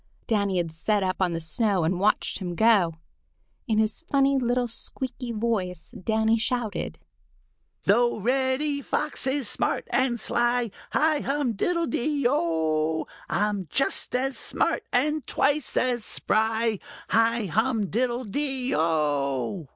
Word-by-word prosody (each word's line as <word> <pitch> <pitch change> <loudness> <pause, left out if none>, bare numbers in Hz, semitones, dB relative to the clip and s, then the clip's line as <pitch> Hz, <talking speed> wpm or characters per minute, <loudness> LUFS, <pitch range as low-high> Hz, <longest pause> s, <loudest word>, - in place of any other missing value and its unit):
Danny 200 -5 0
had 170 -2 -1
sat 200 +5 0
up 185 0 -1
on 180 -2 +1
the 165 - -2
snow 185 +3 0
and 175 +3 0
watched 210 +1 +1
him 180 -3 -4
go. 200 -6 +4 0.7
In 220 -2 +1
his 220 +5 0
funny 275 -1 +3
little 245 -1 +1
squeaky 250 +1 -4
voice 210 -7 -2
Danny 220 +3 +1
shouted: 235 -2 -2 0.9
"Though 235 +4 +3
Reddy 260 +5 0
Fox 300 0 0
is 265 -2 0
smart - - -1
and 255 -3 +1
sly, 240 -1 +1 0.2
Hi 310 -1 +3
hum 275 -4 -1
diddle 335 - 0
de 280 +2 0
o! 160 - 0 0.2
I'm 205 -3 -1
just 275 - +2
as 265 +1 -1
smart - - 0
and 300 +4 +1
twice 285 -1 +1
as 245 -3 +2
spry. 220 0 0 0.3
Hi 230 0 +2
hum 220 +4 +1
diddle 245 +2 0
de 265 +3 0
o!" 145 - 0
230 Hz, 135 wpm, -26 LUFS, 190-260 Hz, 0.9 s, go